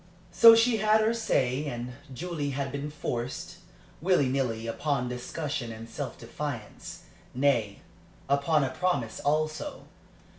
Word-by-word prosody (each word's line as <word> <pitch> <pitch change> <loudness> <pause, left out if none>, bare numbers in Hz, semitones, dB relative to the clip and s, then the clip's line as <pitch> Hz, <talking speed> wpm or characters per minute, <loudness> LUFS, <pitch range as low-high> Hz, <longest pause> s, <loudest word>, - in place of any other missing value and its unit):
So 230 -1 +9
she 230 0 +4
had 215 +1 +4
her 220 +1 +2
say, 145 - 0
and 120 -1 -5 0.2
Julie 155 +1 -3
had 140 -1 -2
been 140 +2 -4
forced, 125 -4 -4 0.4
willy 175 -5 +3
nilly, 125 -4 -1
upon 125 +2 -1
discussion 125 0 -4
and 110 +1 -8
self - - -6
defence - - -7 0.3
nay, 120 -7 +1 0.5
upon 140 +2 +2
a 130 - -1
promise 130 -8 -1
also. 155 - -1
140 Hz, 125 wpm, -28 LUFS, 125-165 Hz, 0.5 s, So